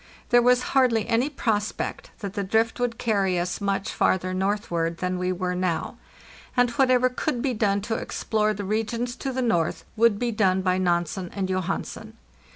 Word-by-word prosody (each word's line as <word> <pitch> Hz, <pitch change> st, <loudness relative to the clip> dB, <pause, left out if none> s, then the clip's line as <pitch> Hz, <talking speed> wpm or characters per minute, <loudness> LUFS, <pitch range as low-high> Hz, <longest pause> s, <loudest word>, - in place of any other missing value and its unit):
There 240 Hz, 0 st, +6 dB
was 250 Hz, +1 st, +4 dB
hardly 245 Hz, -5 st, +3 dB
any 240 Hz, +4 st, +2 dB
prospect 220 Hz, -7 st, -2 dB
that 200 Hz, -2 st, -4 dB
the 200 Hz, -, -2 dB
drift 225 Hz, +5 st, +1 dB
would 245 Hz, -1 st, -1 dB
carry 200 Hz, -5 st, +1 dB
us 175 Hz, +3 st, -3 dB
much 195 Hz, -1 st, -1 dB
farther 185 Hz, 0 st, +1 dB
northward 185 Hz, -4 st, -1 dB
than 180 Hz, 0 st, -2 dB
we 180 Hz, 0 st, 0 dB
were 180 Hz, 0 st, -2 dB
now, 180 Hz, -2 st, -1 dB, 0.6 s
and 245 Hz, -1 st, +4 dB
whatever 255 Hz, 0 st, +4 dB
could 250 Hz, 0 st, -2 dB
be 265 Hz, -3 st, +1 dB
done 205 Hz, -3 st, +1 dB
to 225 Hz, +3 st, -3 dB
explore 215 Hz, -1 st, -1 dB
the 200 Hz, 0 st, -5 dB
regions 230 Hz, +4 st, -2 dB
to 270 Hz, -, -3 dB
the 260 Hz, 0 st, -1 dB
north 175 Hz, -9 st, 0 dB
would 230 Hz, -2 st, +4 dB
be 240 Hz, +2 st, -1 dB
done 190 Hz, -4 st, +2 dB
by 185 Hz, 0 st, +2 dB
Nansen 175 Hz, 0 st, 0 dB
and 195 Hz, -2 st, -1 dB
Johansen. 195 Hz, +4 st, -3 dB
210 Hz, 175 wpm, -25 LUFS, 185-235 Hz, 0.6 s, There